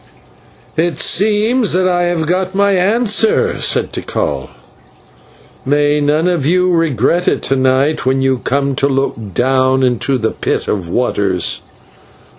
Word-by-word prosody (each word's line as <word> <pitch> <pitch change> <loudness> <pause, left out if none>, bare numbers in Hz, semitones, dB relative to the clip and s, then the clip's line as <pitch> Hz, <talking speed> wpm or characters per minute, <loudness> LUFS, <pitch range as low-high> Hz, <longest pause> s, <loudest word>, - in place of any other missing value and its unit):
"It 165 -2 0
seems 215 +2 +1
that 185 +1 +2
I 175 -1 +1
have 175 -2 -1
got 185 +3 -1
my 200 0 +2
answer," 210 +3 +1
said - - 0
Tikal. - - -3 1.1
"May 145 +2 +1
none 150 +4 +1
of 175 -5 0
you 180 +4 +2
regret 165 +1 +1
it - - 0
to 135 - 0
night 130 +3 +1
when 130 +1 0
you 130 -1 +1
come 140 +2 -1
to 140 - +2
look 135 0 -1 0.2
down 130 +1 +2
into 130 +2 0
the 110 -2 -1
Pit - - -3
of 95 -5 -3
Waters. 100 -5 -1
150 Hz, 140 wpm, -15 LUFS, 130-185 Hz, 1.1 s, that